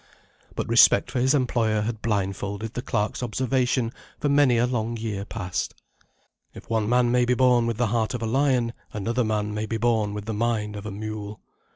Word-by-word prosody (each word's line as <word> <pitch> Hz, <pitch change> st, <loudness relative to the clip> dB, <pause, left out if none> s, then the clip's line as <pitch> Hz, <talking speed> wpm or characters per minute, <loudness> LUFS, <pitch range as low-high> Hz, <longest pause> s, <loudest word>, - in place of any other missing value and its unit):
But -, -, -3 dB
respect -, -, +5 dB
for -, -, -1 dB
his 130 Hz, +4 st, +3 dB
employer 115 Hz, -5 st, +1 dB
had 110 Hz, 0 st, -3 dB
blindfolded 100 Hz, 0 st, -2 dB
the 125 Hz, -, -3 dB
clerk's 110 Hz, -4 st, -2 dB
observation 125 Hz, 0 st, 0 dB, 0.3 s
for 145 Hz, -, 0 dB
many 140 Hz, -4 st, +4 dB
a 120 Hz, -, +3 dB
long 120 Hz, -2 st, -2 dB
year 105 Hz, -3 st, -4 dB
past. 95 Hz, -5 st, -4 dB, 0.8 s
If -, -, -11 dB
one 110 Hz, -2 st, 0 dB
man 120 Hz, 0 st, +3 dB
may 125 Hz, 0 st, +3 dB
be 125 Hz, +1 st, +2 dB
born 125 Hz, -2 st, +4 dB
with 115 Hz, -2 st, -2 dB
the 120 Hz, -, +2 dB
heart 115 Hz, +1 st, 0 dB
of 120 Hz, -, -4 dB
a -, -, 0 dB
lion, 125 Hz, -1 st, +1 dB, 0.2 s
another 115 Hz, +4 st, -1 dB
man 105 Hz, -1 st, -1 dB
may 105 Hz, +1 st, -3 dB
be 115 Hz, -, -2 dB
born 110 Hz, -3 st, +1 dB
with 105 Hz, -1 st, -5 dB
the 110 Hz, -, -3 dB
mind 105 Hz, -1 st, -1 dB
of 105 Hz, +1 st, -6 dB
a -, -, -5 dB
mule. 105 Hz, 0 st, -6 dB
115 Hz, 200 wpm, -25 LUFS, 105-125 Hz, 0.8 s, respect